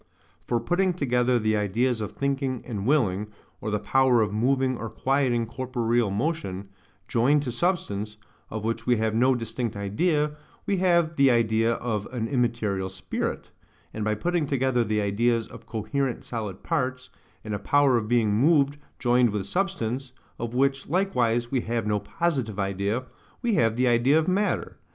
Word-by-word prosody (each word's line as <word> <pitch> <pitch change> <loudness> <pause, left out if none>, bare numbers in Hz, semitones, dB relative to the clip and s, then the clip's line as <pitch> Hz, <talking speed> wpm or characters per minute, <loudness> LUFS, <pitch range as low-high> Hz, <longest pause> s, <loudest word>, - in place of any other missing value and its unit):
For 120 - +1
putting 175 +9 +1
together 125 -5 +2
the 110 -1 +1
ideas 110 +4 0
of 105 - -4
thinking 135 -2 -2
and 105 -3 -4
willing, 105 -9 +2 0.3
or 105 - -3
the 105 - +1
power 125 +3 +3
of 105 -1 -3
moving 130 +3 +1
or 115 -1 -5
quieting 130 -3 +1
corporeal 120 -1 0
motion, 100 - -2 0.4
joined 140 +5 +3
to 125 - -3
substance, 110 - -1 0.3
of 110 -1 -5
which 115 +1 -2
we 125 - +4
have 110 0 0
no 125 +3 +3
distinct 115 -1 -3
idea, 150 - 0 0.3
we 200 - 0
have 170 -3 +2
the 140 -1 +6
idea 115 -1 +2
of 110 -4 -3
an 115 -3 -2
immaterial 115 -7 0
spirit; 95 0 -4 0.4
and 110 - -3
by 105 0 +1
putting 170 +6 0
together 130 -3 +1
the 105 -1 0
ideas 115 +3 +1
of - - -13
coherent 125 +3 -2
solid 105 -5 -5
parts, 130 -5 -2 0.3
and 110 -1 -5
a 100 - -2
power 140 +4 +3
of 110 -3 0
being 115 -3 +2
moved 140 +4 +3 0.2
joined 125 -1 +3
with 105 -2 -3
substance, 135 - -2 0.3
of 120 +1 -4
which 135 +1 +1
likewise 120 -10 +1
we 130 -3 +1
have 115 -1 -2
no 105 -1 +1
positive 135 - -2
idea, 100 +5 -1 0.4
we 235 -2 +1
have 115 - +2
the 125 +1 +2
idea 120 +5 +4
of 160 - +1
matter. 200 +3 0
120 Hz, 165 wpm, -26 LUFS, 110-135 Hz, 0.4 s, the